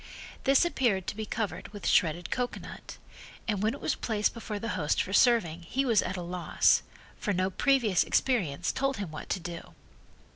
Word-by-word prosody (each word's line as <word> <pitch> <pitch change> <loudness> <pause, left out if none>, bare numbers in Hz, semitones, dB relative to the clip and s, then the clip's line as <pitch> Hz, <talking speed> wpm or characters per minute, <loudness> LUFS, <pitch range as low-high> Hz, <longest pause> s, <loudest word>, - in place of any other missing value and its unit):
This 275 +5 +5
appeared 230 - +1
to - - -4
be 215 0 -5
covered 220 -1 -3
with 205 0 -10
shredded 170 -2 +2
cocoanut, 250 -1 -4 0.5
and 205 -4 0
when 220 +4 +1
it - - -10
was - - 0
placed 215 -2 0
before 220 -2 -5
the 230 +3 -4
host 155 -5 0
for 195 - -6
serving 205 -10 +4
he 265 +10 -1
was 230 -5 +4
at 190 - -3
loss, 175 0 +2 0.4
for 205 - -1
no 185 +1 0
previous 240 - +3
experience 180 - +1
told 275 -1 -1
him 200 -6 -5
what 155 - -8
to - - 0
do. 170 0 -8
205 Hz, 180 wpm, -29 LUFS, 180-240 Hz, 0.5 s, This